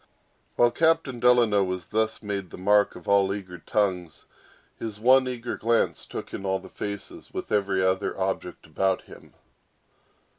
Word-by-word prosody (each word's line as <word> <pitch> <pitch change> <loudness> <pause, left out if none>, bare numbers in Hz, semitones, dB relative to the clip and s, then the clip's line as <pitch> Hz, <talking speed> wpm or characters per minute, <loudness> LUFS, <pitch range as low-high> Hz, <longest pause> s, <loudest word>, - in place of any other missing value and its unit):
While 120 0 +4
Captain 160 -3 +1
Delano 120 -5 +4
was 90 -2 -3
thus 110 +2 -1
made 100 -3 -4
the - - -10
mark 100 +2 +3
of - - -12
all 100 -1 +4
eager 95 -3 -6
tongues, 90 -3 -1 0.5
his 110 -2 -5
one 130 +3 +5
eager 120 -1 -4
glance 115 +1 0
took - - -7
in - - -5
all 95 0 0
faces, 100 -1 -7
with - - -6
every 100 -2 +1
other 95 +1 0
object 95 -2 -3
about 95 +4 0
him. - - -15
100 Hz, 150 wpm, -26 LUFS, 95-115 Hz, 0.5 s, one